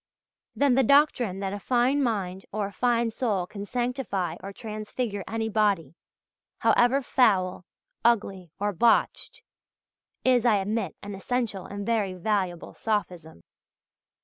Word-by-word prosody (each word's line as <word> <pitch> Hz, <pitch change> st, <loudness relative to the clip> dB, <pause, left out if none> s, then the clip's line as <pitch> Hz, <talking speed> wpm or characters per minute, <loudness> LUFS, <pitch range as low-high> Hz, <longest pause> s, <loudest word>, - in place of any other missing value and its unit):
Then 280 Hz, -2 st, +3 dB
the 265 Hz, -, +4 dB
doctrine 250 Hz, -7 st, +3 dB
that 195 Hz, 0 st, -2 dB
a 205 Hz, -, -4 dB
fine 250 Hz, +6 st, +2 dB
mind 195 Hz, -7 st, -2 dB
or 210 Hz, 0 st, -1 dB
a 200 Hz, -, -6 dB
fine 235 Hz, -1 st, +1 dB
soul 215 Hz, -7 st, -1 dB
can 200 Hz, +2 st, -8 dB
sanctify 240 Hz, -, -2 dB
or 195 Hz, -, -7 dB
transfigure 215 Hz, 0 st, -4 dB
any 225 Hz, 0 st, -2 dB
body 200 Hz, -9 st, +1 dB, 0.6 s
however 260 Hz, +3 st, +3 dB
foul, 185 Hz, -9 st, +2 dB, 0.4 s
ugly, 200 Hz, -6 st, +1 dB
or 205 Hz, +1 st, 0 dB
botched 240 Hz, -, +1 dB, 0.8 s
is, 250 Hz, -2 st, +4 dB
I 235 Hz, -3 st, +4 dB
admit, 210 Hz, +3 st, -1 dB
an 205 Hz, 0 st, -6 dB
essential 210 Hz, -1 st, -3 dB
and 200 Hz, 0 st, -6 dB
very 210 Hz, -5 st, 0 dB
valuable 185 Hz, -2 st, -2 dB
sophism. 180 Hz, -, -3 dB
210 Hz, 130 wpm, -26 LUFS, 195-240 Hz, 0.8 s, the